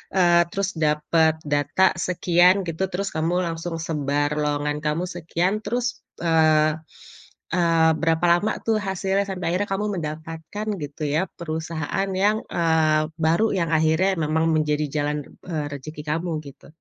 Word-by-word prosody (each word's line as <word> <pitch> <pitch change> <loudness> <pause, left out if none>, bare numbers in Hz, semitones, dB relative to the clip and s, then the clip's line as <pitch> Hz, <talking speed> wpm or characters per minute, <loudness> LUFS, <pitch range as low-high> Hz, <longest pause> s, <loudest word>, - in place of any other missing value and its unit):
eee, 175 -2 +5
terus 195 0 -1
dapet 160 +1 +2
data 145 +6 +2
sekian" 180 +2 +3
gitu. 165 +4 -1
Terus 195 +2 -2
kamu 165 +3 +1
langsung 165 +1 -4
sebar 145 -2 -1
lowongan 150 0 -1
kamu 155 +4 0
sekian, 175 +3 -1
terus, 245 +3 -2 0.2
eee, 155 -2 +4 0.8
eee, 165 -2 +4
berapa 165 +1 +2
lama 215 +3 -1
tuh 225 -1 +2
hasilnya 190 +1 0
sampai 180 -3 -2
akhirnya 205 +2 -1
kamu 210 +2 -1
mendapatkan, 160 +6 -6 0.2
gitu 145 +2 -7
ya, 150 +5 +1 0.2
perusahaan 160 +3 -3
yang, 210 +5 +1
eee, 160 -2 +2 0.2
baru 165 +8 +2
yang 170 -3 0
akhirnya 160 +5 +3
memang 160 +1 +1
menjadi 150 -1 +1 0.2
jalan, 150 +1 -1 0.3
eee, 155 -4 -2
rezeki 150 +2 -7
kamu, 165 +3 -1
gitu? 140 - -13
165 Hz, 140 wpm, -23 LUFS, 155-185 Hz, 0.8 s, eee